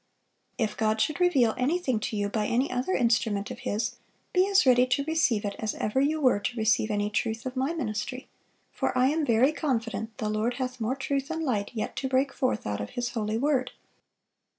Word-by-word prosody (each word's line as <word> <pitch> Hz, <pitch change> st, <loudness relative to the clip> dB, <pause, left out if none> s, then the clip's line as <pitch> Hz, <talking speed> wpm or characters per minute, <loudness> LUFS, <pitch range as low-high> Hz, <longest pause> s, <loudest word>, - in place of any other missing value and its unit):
If 220 Hz, -3 st, -1 dB
God 220 Hz, 0 st, +1 dB
should 305 Hz, +9 st, 0 dB
reveal 275 Hz, -11 st, +4 dB
anything 265 Hz, -3 st, +1 dB
to 215 Hz, 0 st, -3 dB
you 205 Hz, 0 st, 0 dB
by 210 Hz, 0 st, -1 dB
any 250 Hz, +4 st, +1 dB
other 255 Hz, +9 st, -1 dB
instrument 225 Hz, -4 st, +1 dB
of -, -, -7 dB
His, 215 Hz, +1 st, -2 dB, 0.4 s
be 370 Hz, +1 st, +4 dB
as 395 Hz, -6 st, +4 dB
ready 250 Hz, -1 st, +5 dB
to 265 Hz, +3 st, +1 dB
receive 275 Hz, -9 st, +1 dB
it 200 Hz, -1 st, -3 dB
as 215 Hz, -1 st, -2 dB
ever 235 Hz, +6 st, 0 dB
you 305 Hz, +3 st, +1 dB
were 255 Hz, -7 st, +3 dB
to 240 Hz, +4 st, -3 dB
receive 220 Hz, 0 st, +2 dB
any 205 Hz, 0 st, -1 dB
truth 225 Hz, +2 st, -2 dB
of 255 Hz, 0 st, -4 dB
my 265 Hz, +4 st, 0 dB
ministry; 250 Hz, -1 st, -4 dB, 0.4 s
for -, -, -1 dB
I 255 Hz, +1 st, +4 dB
am 315 Hz, +2 st, 0 dB
very 250 Hz, +1 st, +4 dB
confident 230 Hz, -7 st, -2 dB
the 215 Hz, -, -2 dB
Lord 215 Hz, +3 st, 0 dB
hath 255 Hz, -2 st, -4 dB
more 230 Hz, +4 st, 0 dB
truth 275 Hz, 0 st, -2 dB
and 325 Hz, 0 st, -2 dB
light 215 Hz, -8 st, -1 dB
yet 215 Hz, -, -3 dB
to 265 Hz, -, -1 dB
break 265 Hz, +1 st, +1 dB
forth 255 Hz, -2 st, -1 dB
out 105 Hz, 0 st, -2 dB
of 105 Hz, -, -5 dB
His 245 Hz, 0 st, -3 dB
holy 220 Hz, -2 st, -2 dB
word." 260 Hz, -1 st, 0 dB
245 Hz, 210 wpm, -27 LUFS, 215-275 Hz, 0.4 s, ready